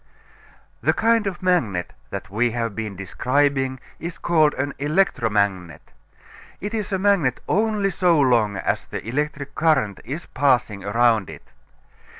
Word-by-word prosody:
The - - +2
kind 225 -2 +2
of 185 -1 -5
magnet 115 - 0 0.2
that 100 +2 -7
we 120 +4 +2
have 115 -2 -2
been 105 -2 -5
describing 130 +6 0 0.2
is 170 +1 -6
called 155 -3 +2
an 140 +1 -2
electromagnet. 105 - 0 0.7
It 205 +4 -5
is 215 -3 -3
a 190 - +1
magnet 185 -10 +2
only 210 -1 +1
so 175 -4 +3
long 115 -7 +3
as - - -1
the - - -7
electric 140 +2 -3
current 145 -12 +1
is 145 +8 -6
passing 125 -7 +1
around 110 -1 +2
it. - - -12
135 Hz, 140 wpm, -22 LUFS, 110-170 Hz, 0.7 s, so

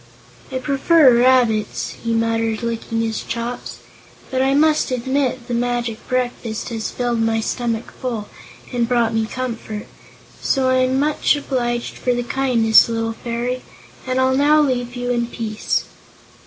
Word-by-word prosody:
"I 260 - -2
prefer 275 0 +4
rabbits," 240 -4 +2
he 230 - -1
muttered, 225 0 0
licking 230 0 -2
his 225 -1 -2
chops, 235 +1 -5 0.5
"but 260 0 +1
I 270 +1 +2
must 305 +1 +3
admit 255 0 -1
the 245 - -3
magic 240 -1 -1
breakfast 245 -3 -2
has 225 -2 -3
filled 240 -2 -1
my 225 0 +1
stomach 230 0 -2
full, 230 -5 -3 0.5
and 240 -1 0
brought 235 -2 +2
me 225 -1 0
comfort. 225 -4 -5 0.6
So 265 -1 +1
I'm 255 +1 +2
much 300 +1 +2
obliged 240 -4 -2
for 250 -1 +1
the 245 - -1
kindness, 235 -4 +4
little 225 0 -1
Fairy, 240 +2 -3 0.5
and 255 0 0
I'll 260 0 +3
now 295 +3 +5
leave 250 -4 0
you 245 0 -2
in 235 -1 0
peace." 220 -2 -2
245 Hz, 145 wpm, -20 LUFS, 230-260 Hz, 0.6 s, now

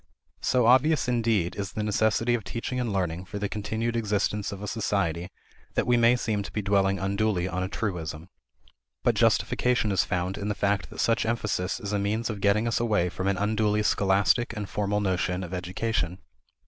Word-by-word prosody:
So 125 -2 +2
obvious, 130 +4 +4
indeed, 115 -7 +1
is 100 -2 -4
the 110 - -2
necessity 110 +3 +2
of 120 -3 -1
teaching 115 +6 -4
and 120 -3 -1
learning 90 -2 -2
for 105 - -6
the 100 0 -1
continued 110 +3 -2
existence 105 -1 0
of 100 0 -7
a - - -4
society 95 -5 -1 0.5
that - - +1
we 125 - +3
may 120 +1 +5
seem 110 -4 -1
to 100 - -7
be 105 - -3
dwelling 100 0 +2
unduly 100 -1 0
on 90 0 -3
a 95 - -1
truism. 85 -6 -4 0.8
But - - +3
justification 125 -4 +2
is 95 -2 +3
found 90 +2 -2
in 100 - -3
the 105 - -1
fact 100 -1 0
that - - -12
such 115 - +2
emphasis 105 -5 -1
is 105 -3 -4
a 100 - +1
means 110 +4 -1
of 100 -2 -7
getting 105 +3 +3
us 115 - +1
away 105 -6 +1
from 95 +2 -3
an 100 -1 +1
unduly 105 +1 +1
scholastic 100 +4 +2
and 105 -2 -3
formal 105 +1 -1
notion 90 -1 0
of 90 0 -7
education. 90 0 -2
105 Hz, 195 wpm, -27 LUFS, 95-115 Hz, 0.8 s, may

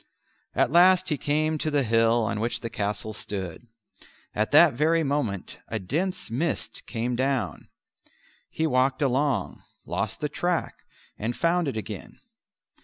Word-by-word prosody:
At - - +2
last 180 +2 +6
he 150 - +2
came 155 +1 0
to 155 - 0
the 145 -2 +2
hill 115 0 +3
on 105 -1 -1
which 115 +1 -2
the 115 - -5
castle 105 +1 -3
stood. 95 0 -6 0.7
At 110 +1 0
that 155 +1 +7
very 160 +5 +2
moment 135 - -2
a 110 - -2
dense 175 - -2
mist 150 +7 -2
came 120 +1 -2
down; 130 -5 -1 0.8
he 160 - -1
walked 130 0 +2
along, 135 0 0 0.2
lost - - -3
the 150 - -1
track, 175 +3 -1 0.5
and 115 +3 -2
found 170 0 +1
it 130 - -2
again. 105 -3 -7
135 Hz, 145 wpm, -26 LUFS, 115-155 Hz, 0.8 s, that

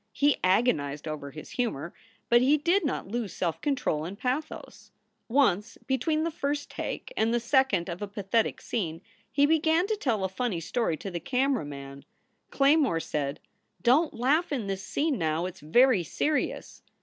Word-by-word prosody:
He 290 0 +3
agonized 175 - +1
over 150 -2 -5
his 155 +2 -10
humor, 225 - -2 0.3
but 240 0 +5
he 280 +4 +4
did 345 +7 +2
not 285 - -2
lose 220 -1 -3
self 170 -3 -2
control 260 - 0
in 180 +5 -5
pathos. 255 +8 -4 0.4
Once, 225 -5 +2
between 310 +4 0
the 335 - -1
first 290 -1 -3
take - - -5
and 220 +1 +2
the 240 - +2
second 235 -7 +2
of 175 +1 -5
a 205 - -3
pathetic 205 +2 -1
scene, 170 -7 -3 0.3
he 280 +1 +4
began 320 +3 +3
to 435 +2 0
tell 240 - -1
a - - +2
funny 190 -1 -2
story 170 0 -1
to 195 - -6
the 175 - -3
camera 265 - 0
man. 140 -1 -9 0.5
Claymore 275 - +3
said: 145 -3 -3 0.4
"Don 290 +7 +4
t - - -14
laugh 295 +9 +2
in 255 -7 -1
this 195 -1 -3
scene, 285 +4 -1
now. 160 +1 0
It 185 0 -6
s - - -15
very 240 - +4
serious." 295 - -2
235 Hz, 175 wpm, -28 LUFS, 170-280 Hz, 0.5 s, but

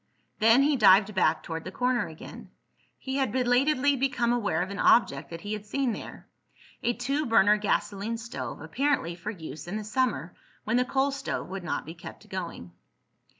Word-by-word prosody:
Then 225 +5 +6
he 290 -1 +2
dived 200 -1 +6
back 165 -4 +2
toward 165 -1 -5
the 185 - -7
corner 250 +3 0
again. 160 -1 -11 0.5
He 265 0 -4
had 270 -1 0
belatedly 260 +3 +2
become 245 -3 +1
aware 205 -8 0
of 190 - -6
an 200 - -6
object 140 - +3
that 165 0 -8
he 205 +1 -4
had 210 -1 -5
seen 270 +2 0
there—a 240 +2 -7
two 275 +5 -2
burner 210 -2 +5
gasoline 210 +1 -1
stove, 235 +2 -6
apparently 275 - 0
for 175 +4 -7
use 160 -6 -8
in 195 +5 -3
the 215 - -5
summer 215 - -1 0.3
when 220 +3 +1
the 250 - +2
coal 270 +2 +1
stove 275 -7 -4
would 190 0 -6
not 175 - -3
be 160 - -7
kept 170 -1 -11
going. 170 - -6
220 Hz, 180 wpm, -27 LUFS, 185-255 Hz, 0.5 s, Then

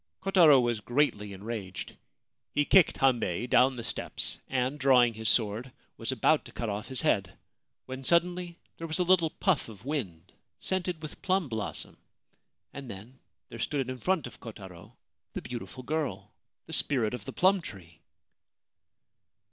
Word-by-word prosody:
Kotaro 170 -8 +6
was 120 -3 +1
greatly 115 -4 0
enraged. 100 -2 -6 0.6
He 145 - +3
kicked 185 0 +5
Hambei 120 -7 +1
down 130 +1 +4
the 120 - -6
steps, - - -3
and, 130 +2 -1
drawing 125 -3 +5
his 110 0 -2
sword, 115 +3 +1 0.2
was - - -2
about - - +3
to - - -11
cut 115 - -4
off 105 +2 -4
his 130 -2 -2
head, 100 - +1 0.5
when 130 +1 -7
suddenly 175 +2 +1 0.2
there 165 - -5
was 160 - -1
a 180 - +2
little 175 -2 +4
puff 180 - 0
of 105 0 -13
wind 95 - -4 0.2
scented 180 -3 -1
with 155 - -8
plum 185 -3 +1
blossom, 110 -3 -4 0.8
and 140 -3 -8
then 115 +7 -10 0.3
there 115 - -9
stood 135 +1 -1
in 130 - -7
front 185 +2 0
of 120 - -10
Kotaro 95 -6 -11 0.4
the - - -4
beautiful 125 +1 -7
girl, 150 +1 -3 0.3
the - - -9
Spirit 120 -6 +2
of 125 - -6
the - - -5
Plum 190 +1 +3
Tree 90 - -11
130 Hz, 155 wpm, -29 LUFS, 110-155 Hz, 0.8 s, Kotaro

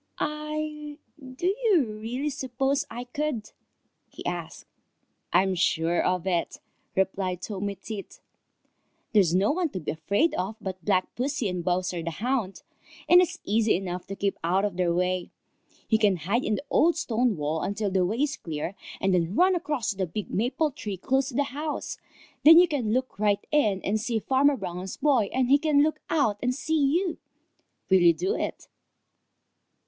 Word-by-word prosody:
"I 300 0 -4 0.2
I - - -15
do 255 +6 -7 0.2
you 380 - +4
really 230 +7 -4
suppose 270 +1 -1
I 235 +2 -6
could?" 250 -3 -3 0.6
he - - -11
asked. - - -5 0.7
"I'm 190 +2 +3
sure 170 -1 +1
of 180 -1 0
it," 175 -3 -1 0.4
replied 190 -1 -1
Tommy 200 -1 -3
Tit. 210 -3 -8 0.9
"There's 185 -6 +4
no 195 +6 +3
one 345 +1 0
to 190 - -5
be 155 - -3
afraid 200 - +1
of 190 +4 -2
but 185 -3 -6
Black 185 -3 +1
Pussy 260 -2 -1
and 180 -1 -3
Bowser 180 0 -1
the 170 - -3
Hound, 215 +2 -2 0.4
and 355 +1 +8
it's 360 0 -1
easy 220 +1 +2
enough 180 -1 -4
to 195 - -5
keep 195 0 -2
out 185 +4 +2
of 205 - -3
their 180 -1 +1
way. 180 +1 0 0.6
You 220 - +3
can 205 -3 +4
hide 195 +9 -1
in 215 - 0
the 280 - -6
old 335 +2 +4
stone 240 - 0
wall 155 +2 -1
until 205 0 -2
the 185 -1 +2
way 220 +10 0
is 290 -2 -1
clear 160 +2 -4 0.3
and 195 0 +1
then 175 +1 +1
run 370 +5 +5
across 295 -10 -1
to 200 - -8
the 190 -2 -1
big 205 +5 -5
maple 255 +8 0
tree 210 -7 -6
close 265 +7 +1
to 255 - -7
the 285 - +3
house. 300 +2 -4 0.4
Then 320 +2 +10
you 355 +1 +7
can 260 -9 -1
look 255 -2 -1
right 205 -1 +1
in 210 -11 +2
and 215 +2 0
see 230 0 -1
Farmer 270 +5 +2
Brown's 185 -1 -5
boy, 265 -8 +2
and 255 -1 +1
he 280 +3 +5
can 290 -2 +3
look 310 +1 0
out 225 -10 +1
and 250 0 0
see 315 +2 0
you. 355 -1 -1 0.7
Will 190 - +7
you 170 -1 +6
do 380 +3 -1
it?" - - -4
215 Hz, 180 wpm, -26 LUFS, 185-285 Hz, 0.9 s, Then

